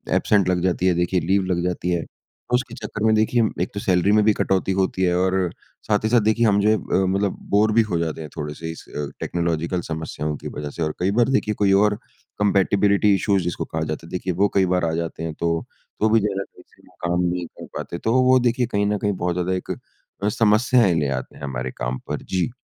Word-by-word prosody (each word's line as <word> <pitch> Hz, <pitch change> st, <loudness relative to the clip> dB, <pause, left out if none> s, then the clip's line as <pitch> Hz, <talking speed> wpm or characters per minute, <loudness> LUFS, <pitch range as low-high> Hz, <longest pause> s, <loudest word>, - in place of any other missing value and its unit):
Absent 100 Hz, -3 st, +3 dB
लग 90 Hz, -1 st, +1 dB
जाती 90 Hz, 0 st, +1 dB
है, 90 Hz, -, +4 dB
देखिए 90 Hz, +1 st, +1 dB
लीव 95 Hz, +4 st, +2 dB
लग 90 Hz, -2 st, -1 dB
जाती 90 Hz, 0 st, -2 dB
है। 85 Hz, -2 st, 0 dB, 0.5 s
उसके 125 Hz, -1 st, 0 dB
चक्कर 110 Hz, -3 st, -5 dB
में 110 Hz, -, +4 dB
देखिए 110 Hz, +3 st, +2 dB, 0.2 s
एक -, -, -4 dB
तो 100 Hz, -, -3 dB
सैलरी 95 Hz, 0 st, +2 dB
में 105 Hz, 0 st, +4 dB
भी 110 Hz, -, +5 dB
कटौती 95 Hz, -1 st, 0 dB
होती 95 Hz, -1 st, 0 dB
है 90 Hz, -1 st, +2 dB
और 95 Hz, +1 st, +1 dB, 0.5 s
साथ 105 Hz, -1 st, +1 dB
ही 110 Hz, -, +1 dB
साथ 120 Hz, +1 st, +5 dB
देखिए 110 Hz, +2 st, +2 dB
हम 100 Hz, -2 st, +4 dB
जो 105 Hz, -, +3 dB
है 110 Hz, -, +5 dB
अ, 95 Hz, -2 st, 0 dB
मतलब 100 Hz, +1 st, 0 dB
बोर 105 Hz, +2 st, +3 dB
भी 115 Hz, -, +5 dB
हो 85 Hz, -, 0 dB
जाते 80 Hz, -1 st, -3 dB
हैं, 75 Hz, -, -7 dB
थोड़े-से 75 Hz, +2 st, -5 dB
इस 80 Hz, -, -10 dB
अ, 75 Hz, -, -2 dB
टेक्नोलॉज़ीकल 85 Hz, +1 st, -1 dB
समस्याओं 75 Hz, -1 st, -3 dB
की -, -, -8 dB
वज़ह 75 Hz, 0 st, -4 dB
से। 80 Hz, -, -8 dB
और 75 Hz, -1 st, -1 dB
कई 95 Hz, +2 st, +1 dB
बार 120 Hz, -, +4 dB
देखिए 120 Hz, -5 st, +1 dB
कोई 100 Hz, -2 st, +4 dB
और 105 Hz, 0 st, +2 dB, 0.4 s
कम्पैटिबिलिटी 100 Hz, 0 st, +3 dB
इश्यूज़ 95 Hz, -1 st, +1 dB
जिसको 85 Hz, -1 st, -3 dB
कहा 80 Hz, -, -4 dB
जाता 80 Hz, +1 st, -5 dB
है, -, -, -13 dB
देखिए 90 Hz, 0 st, -2 dB
वो 100 Hz, +4 st, +3 dB
कई 95 Hz, -1 st, +4 dB
बार 90 Hz, -2 st, +1 dB
आ 80 Hz, -, 0 dB
जाते 85 Hz, -1 st, -4 dB
हैं, 80 Hz, -1 st, -3 dB
तो 85 Hz, +1 st, -1 dB, 0.3 s
तो 110 Hz, -, +3 dB
भी 115 Hz, +1 st, +5 dB
ज़्यादा 100 Hz, -2 st, -1 dB
सही -, -, -19 dB
से -, -, -25 dB
वो -, -, -23 dB
काम 85 Hz, +1 st, +1 dB
नहीं 90 Hz, 0 st, -1 dB
कर -, -, -12 dB
पाते। 85 Hz, -, -5 dB
तो 110 Hz, +6 st, -1 dB
वो 130 Hz, 0 st, +5 dB
देखिए 125 Hz, 0 st, +1 dB
कहीं 100 Hz, 0 st, +1 dB
न 105 Hz, -, +1 dB
कहीं 105 Hz, 0 st, -1 dB
बहुत 90 Hz, -1 st, -1 dB
ज़्यादा 90 Hz, +1 st, -1 dB
एक 90 Hz, -, -4 dB, 0.5 s
अ, 105 Hz, -, +3 dB
समस्याएँ 115 Hz, -2 st, +3 dB
ले 75 Hz, -, 0 dB
आते -, -, -12 dB
हैं -, -, -13 dB
हमारे 65 Hz, -2 st, -3 dB
काम 65 Hz, 0 st, -2 dB
पर। -, -, -4 dB
जी। 95 Hz, +2 st, -1 dB
95 Hz, 245 wpm, -22 LUFS, 85-105 Hz, 0.5 s, भी